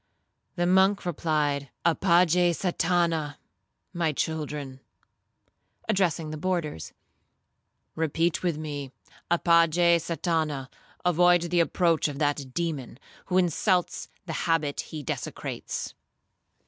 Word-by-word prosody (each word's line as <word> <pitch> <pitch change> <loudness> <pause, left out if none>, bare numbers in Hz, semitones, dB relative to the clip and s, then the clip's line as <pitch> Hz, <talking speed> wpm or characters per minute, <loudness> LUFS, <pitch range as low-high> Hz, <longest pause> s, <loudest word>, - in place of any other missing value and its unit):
The 175 -1 0
monk 190 +2 +3
replied, 150 -4 -1 0.2
'Apage 175 +1 +4
Satana. 170 -4 0 0.6
My 170 -3 0
children,' 150 -3 -3 1.1
addressing 175 -6 0
the 155 - -5
boarders, 170 - -2 1.0
'repeat 165 +1 0
with 175 -4 0
me, 145 -3 -5 0.4
apage 170 0 +4
Satana; 160 -5 -2 0.4
avoid 175 0 +4
the 175 - +3
approach 170 -1 +2
of 145 -2 -5
that 145 -3 -1
demon, 155 -8 -3 0.3
who 185 - +1
insults 180 +1 +1 0.2
the 165 - -5 0.2
habit 150 -3 +1
he 155 -2 -8
desecrates.' - - -5
165 Hz, 95 wpm, -27 LUFS, 150-175 Hz, 1.1 s, Apage